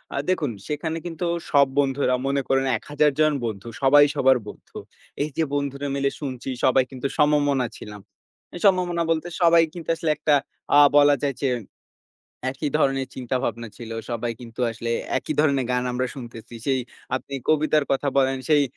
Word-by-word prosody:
আ - - -2
দেখুন 155 -8 0 0.2
সেখানে 160 +2 -3
কিন্তু 175 0 -4 0.3
সব 140 -1 +5
বন্ধুরা 135 -2 +1
মনে 140 0 +1
করেন 135 0 +2
১০০০ 150 0 +1
জন 155 -1 +4
বন্ধু। 105 -1 -5
সবাই 145 +2 +7
সবার 135 -2 +4
বন্ধু। - - -11 0.5
এইযে 155 +2 -2
বন্ধুরা 140 0 -2
মিলে 140 0 +1
শুনছি 130 -3 -5 0.2
সবাই 130 0 +4
কিন্তু 130 +1 -3
সমমনা 145 -3 +3
ছিলাম। 105 -1 -10 0.5
এই - - -6
সমমনা 180 -3 +3
বলতে, 165 +1 -1
সবাই 170 -1 +6
কিন্তু 170 -3 -8
আসলে 165 -1 -2
একটা 150 - +2 0.4
আ - - +9 0.2
বলা 145 0 +6
যায় 140 -2 0
যে 140 - +1 1.0
একই 140 +2 -3
ধরনের 135 -3 +1
চিন্তা 130 0 -2
ভাবনা 115 0 -3
ছিল। 115 -2 -9 0.2
সবাই 120 0 -2
কিন্তু 115 0 -9
আসলে 115 +1 -5 0.3
একই - - -4
ধরনের 140 -4 +2
গান 125 0 +1
আমরা 130 +1 -1
শুনতেছি। 120 -3 -10
সেই 135 -2 +2 0.4
আপনি 140 +1 -8
কবিতার 155 -1 +3
কথা 135 +1 +1
বলেন, 135 -1 +3
সেই 150 -2 +5
140 Hz, 165 wpm, -24 LUFS, 130-150 Hz, 1.0 s, আ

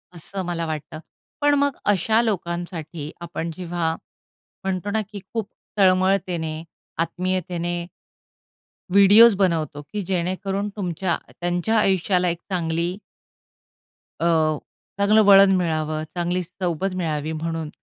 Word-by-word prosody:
असं 185 +3 -4
मला 170 -1 -2
वाटतं. 155 0 -5 0.4
पण 290 0 +4
मग 285 -2 +1 0.2
अशा 220 +4 +2
लोकांसाठी, 170 -6 -3
आपण 170 -1 -4
जेव्हा 170 -2 -2 0.7
म्हणतो 190 +1 -2
ना, 220 +1 +1
की 205 - -7
खूप 225 -3 -2 0.3
तळमळतेने, 185 -4 +2 0.4
आत्मीयतेने 175 0 -2 1.1
व्हिडिओज 205 +4 +8
बनवतो 160 -6 0
की 205 +8 -5
जेणेकरून 190 +3 -1
तुमच्या 180 -3 -1 0.2
त्यांच्या 175 +5 0
आयुष्याला 185 -2 +2
एक 170 - -2
चांगली 170 0 -1 1.2
अ, 160 -2 +2 0.4
चांगलं 210 +2 +5
वळण 195 -1 +8
मिळावं, 155 -3 -1
चांगली 175 +1 0
सोबत 185 +1 -3
मिळावी 155 -4 -2
म्हणून, 160 0 -3
175 Hz, 110 wpm, -23 LUFS, 165-195 Hz, 1.2 s, व्हिडिओज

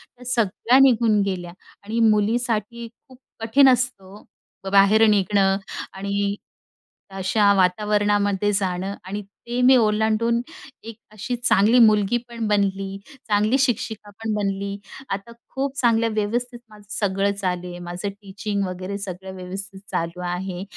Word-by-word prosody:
त्या 250 - -15
सगळ्या 240 +1 +2
निघून 230 -5 +4
गेल्या. 180 -3 -4 0.3
आणि 220 +3 -3
मुलीसाठी 230 +1 0 0.2
खूप 255 -1 -17 0.2
कठीण 230 +5 +4
असतो 235 -6 -1 0.5
ओ, - - -3
बाहेर 200 +3 +6
निघणं 195 -1 +2 0.4
आणि 200 +1 -2 0.8
अशा 200 +2 +3
वातावरणामध्ये 205 +1 +1
जाणं. 190 0 -1
आणि 200 +3 -5
ते 235 +5 -6
मी 260 +1 +7
ओलांडून 220 +1 +1 0.4
एक 225 -1 -9
अशी 215 +4 -4
चांगली 235 -1 +3
मुलगी 215 -1 +4
पण 230 -2 -4
बनली, 195 -1 0 0.3
चांगली 215 +4 +2
शिक्षिका 220 -5 -1
पण 220 +2 -4
बनली, 200 -1 -2 0.3
आता 195 +4 -5 0.2
खूप 275 0 -2
चांगल्या 230 -2 +2
व्यवस्थित 240 +4 -2
माझं 210 -1 -16
सगळं 195 0 +1
चालू 180 -3 -3
आहे. 175 0 -8
माझं 175 +3 -5
टीचिंग 200 0 -4
वगैरे 185 +2 -5
सगळं 190 -1 -7
व्यवस्थित 190 +2 -7
चालू 170 +2 -3
आहे. 180 +1 -4
205 Hz, 130 wpm, -22 LUFS, 195-225 Hz, 0.8 s, मी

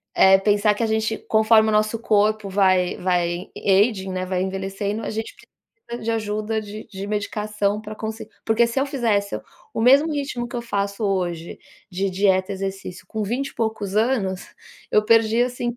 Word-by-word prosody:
eh, 190 0 +7
pensar 205 +1 +3
que 230 - -2
a 225 - +1
gente 220 0 0
conforme 220 0 +5
o - - +1
nosso 215 +1 +1
corpo 215 -2 +1
vai 185 -2 +2
vai 175 0 -1
aging, 195 -1 +2
né, 185 0 -3
vai 185 0 -1
envelhecendo 195 +3 -3
a - - -3
gente 220 0 -5
precisa 235 0 -12
de 230 - 0
ajuda 215 0 -2
de 215 +1 -9
de 195 -2 -7
medicação 210 -1 -1
para 215 0 -8
conseguir 220 0 -6
porque 225 +1 +3
se 235 +3 -1
eu 270 - +1
fizesse 220 -7 0 0.3
o - - -2
mesmo 275 +7 +5
ritmo 275 -4 -3
que 240 - -8
eu 240 - -2
faço 200 -2 -3
hoje 175 -4 -2 0.3
de 190 +2 -1
dieta 190 0 +2
exercício 195 -1 -6
com 220 - -4
vinte 245 +7 -2
e - - -19
poucos 220 -3 -2
anos, 215 -5 +1 0.5
eu 210 - +3
perdia 225 +1 +4
assim. 240 -1 -4
210 Hz, 180 wpm, -22 LUFS, 195-225 Hz, 0.5 s, eh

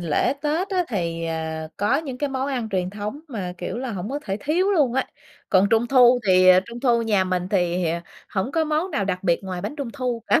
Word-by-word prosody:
lễ 170 - +1
Tết 315 +6 0
á 365 -3 +1
thì, 170 -6 -2
ờ, 160 -1 -4
có 205 +7 +2
những 275 -5 -5
cái 290 - -1
món 265 0 -2
ăn 245 -5 -2
truyền 185 -2 -1
thống 210 +8 -5
mà, 195 -9 -4
kiểu 175 - -4
là, 255 -2 -4
hổng 195 +2 -5
có 285 - -2
thể 195 0 -2
thiếu 350 +7 +1
luôn 290 -10 +2
á. 265 - +1 0.4
Còn 195 +1 +4
Trung 225 +1 +3
thu 250 -1 +6
thì 185 -1 +5 0.2
Trung 235 +1 -8
thu 240 -3 +3
nhà 205 -4 +2
mình 185 0 -1
thì 180 -2 +1 0.4
hổng 210 +7 -2
có 325 -1 +2
món 310 +4 -1
nào 245 - -1
đặc 185 -2 -2
biệt 170 -3 +2
ngoài 185 -2 -4
bánh 210 +10 -5
Trung 280 -4 -4
thu 250 -4 -3
cả, - - +4
225 Hz, 235 wpm, -23 LUFS, 185-275 Hz, 0.4 s, thu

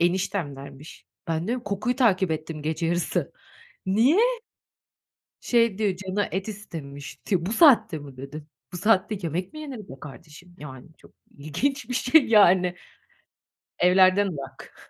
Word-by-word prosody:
eniştemlermiş. 155 -6 -3 0.2
Ben 165 +2 -1
diyorum: 245 0 -2
Kokuyu 205 +5 -2
takip 190 -8 +2
ettim 155 -1 -4
gece 160 +2 -2
yarısı. 175 +1 -1 0.5
Niye? 230 - +3 1.2
Şey 230 -4 +2
diyor, 200 -4 0
canı 190 +2 -2
et 195 +3 -3
istemişti. 165 -2 -5
"Bu 210 - -2
saatte 225 - +5
mi?" 140 -3 -12
dedim. 145 +3 -9 0.3
Bu 180 - -5
saatte 210 +1 +1
yemek 175 +3 -3
mi 310 - -9
yener 275 -6 -7
be 190 - -12
kardeşim? 160 +4 -13
Yani 130 -4 -10
çok - - -19 0.3
ilginç 245 - -2
bir 250 - -3
şey 265 +4 +4
yani. 185 -5 +5 1.1
Evlerden 185 +2 +5
ırak 140 -6 -8
185 Hz, 135 wpm, -25 LUFS, 155-215 Hz, 1.2 s, saatte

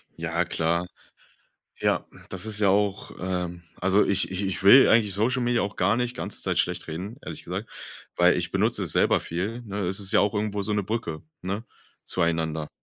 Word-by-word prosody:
Ja, 85 +1 -1
klar. 85 +1 0 0.9
Ja, - - +1 0.2
das 95 +2 -4
ist 105 -1 -2
ja 100 - +4
auch, 100 0 +1
äh 90 -1 -2 0.3
also 95 +3 +3
ich 100 -1 +1
ich 95 +1 -2
ich 95 0 -3
will 125 +7 +8
eigentlich 110 -3 +4
Social 125 +6 +1
Media 120 -1 +2
auch 100 0 -3
gar 100 +5 +2
nicht 125 0 -2
ganze - - -5
Zeit - - -1
schlecht - - -1
reden, 95 +9 -5
ehrlich 80 - -7
gesagt, - - -5 0.5
weil - - +5
ich - - -2
benutze - - +1
es - - -1
selber - - +3
viel, 100 +8 -4
ne? 100 -3 -4
Es 95 +3 -1
ist 100 +1 0
ja 105 - +5
auch 100 0 +2
irgendwo 105 -1 -1
so 105 - -2
'ne 105 0 +1
Brücke, 100 -6 -4 0.2
ne? 100 +5 -3 0.4
Zueinander. 80 -3 -1
100 Hz, 195 wpm, -26 LUFS, 90-105 Hz, 0.9 s, will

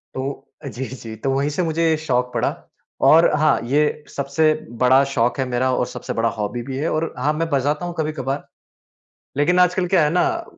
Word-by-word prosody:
तो, 135 +1 -5 0.2
जी, 130 -1 -5
जी, 115 -4 -8
तो 110 +5 -3
वही 140 +2 0
से 165 +5 -1
मुझे 165 0 +1
शौक 125 -5 -1
पड़ा, - - +1 0.5
और 165 +2 +6
हाँ, 155 0 +3
ये 150 +4 +1
सबसे 140 +3 +1 0.3
बड़ा 130 +2 +6
शौक 120 +2 +1
है 135 - +1
मेरा 125 +1 0
और - - 0
सबसे - - -6
बड़ा 115 0 +2
हॉबी 110 +3 -3
भी 130 - -3
है 150 +4 -1
और 160 +1 -2
हाँ 150 +4 +1
मैं 165 +1 -2
बजाता 145 +3 0
हूँ 175 - -4
कभी-कभार, 145 -3 -3 0.9
लेकिन 170 +6 +2
आजकल 180 0 +3
क्या 180 -4 +5
है 150 - +1
ना? 335 - +1
145 Hz, 195 wpm, -21 LUFS, 130-160 Hz, 0.9 s, और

